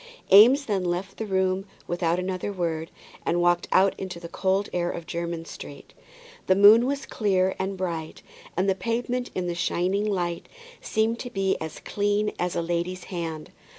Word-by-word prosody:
Eames 250 +8 +8
then 200 -5 0
left 180 +2 -3
the 220 - -4
room 190 0 +1 0.2
without 175 -1 0
another 185 +2 -3
word, 165 -4 -2 0.3
and 175 - +1
walked 175 0 +2
out 190 +1 +5
into 180 -2 -5
the 170 - -8
cold 190 +3 0
air 175 -1 0
of 170 - -5
Jermyn 170 -1 -4
Street. - - -10 0.5
The 185 - +5
moon 215 +5 +7
was 280 0 -2
clear 190 -4 +1
and 190 0 -2
bright, 170 -4 -4 0.3
and 185 +2 +2
the 195 - +4
pavement 240 +5 -2
in 185 - -1
the 175 - -1
shining 185 +4 0
light 175 -4 -2 0.3
seemed 225 +2 0
to 245 - -5
be 195 -4 0
as 160 -1 -6
clean 205 +1 0
as 180 0 -1
a 170 - 0
lady's 175 +2 -2
hand. 165 -3 -5
185 Hz, 175 wpm, -26 LUFS, 175-205 Hz, 0.5 s, Eames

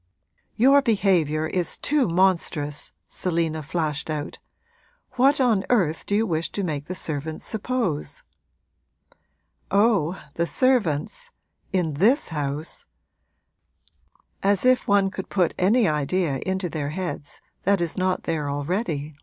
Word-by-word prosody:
'Your 275 +5 +6
behaviour 185 - +2
is 175 +2 -2
too 290 -5 +1
monstrous!' 170 -5 0 0.2
Selina 165 -3 -1
flashed 155 0 -2
out. 150 -1 -4 0.7
'What 265 +3 +3
on 230 -7 +3
earth 180 -10 +1
do 205 - +1
you 220 +2 +2
wish 165 -4 -1
to 200 - -2
make 150 -5 -3
the 185 - -5
servants 155 -2 -4
suppose?' 220 - -2 1.5
'Oh, 200 -5 +2
the 170 0 -1
servants 255 - +1 0.4
in 180 -5 0
this 215 - +3
house; 150 0 -4 1.5
as 200 +2 +2
if 255 0 +3
one 200 -1 +3
could 190 - -6
put 185 -3 +1
any 215 +5 +4
idea 150 -1 0
into 190 -1 -1
their 150 -4 -3
heads 170 -3 -5 0.2
that 200 0 +2
is 170 -2 -2
not 185 -1 0
there 155 -3 -2
already!' 150 0 -2
180 Hz, 125 wpm, -24 LUFS, 155-205 Hz, 1.5 s, Your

